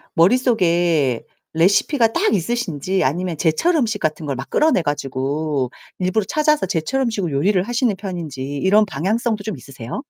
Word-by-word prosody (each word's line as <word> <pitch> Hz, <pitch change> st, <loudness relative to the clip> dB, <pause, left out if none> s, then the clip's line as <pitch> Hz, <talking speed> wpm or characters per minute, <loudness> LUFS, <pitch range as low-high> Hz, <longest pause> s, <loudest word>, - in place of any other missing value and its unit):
머릿속에 175 Hz, -, +2 dB, 0.3 s
레시피가 220 Hz, -, +3 dB
딱 420 Hz, +5 st, +1 dB
있으신지 190 Hz, -, -1 dB
아니면 170 Hz, +4 st, -1 dB
제철 175 Hz, -, +2 dB
음식 225 Hz, -8 st, 0 dB
같은 155 Hz, 0 st, -2 dB
걸 140 Hz, -2 st, -2 dB
막 135 Hz, +2 st, -7 dB
끌어내 305 Hz, -, +3 dB
가지고 145 Hz, -1 st, -2 dB, 0.3 s
일부러 185 Hz, +3 st, 0 dB
찾아서 305 Hz, -6 st, +2 dB
제철 190 Hz, +9 st, -1 dB
음식으로 210 Hz, -, -1 dB
요리를 180 Hz, +7 st, +2 dB
하시는 240 Hz, -1 st, 0 dB
편인지 175 Hz, -8 st, -6 dB, 0.2 s
이런 205 Hz, +7 st, +4 dB
방향성도 210 Hz, -, -1 dB
좀 215 Hz, -5 st, -4 dB
있으세요? 130 Hz, -, -7 dB
185 Hz, 370 characters per minute, -20 LUFS, 150-225 Hz, 0.3 s, 이런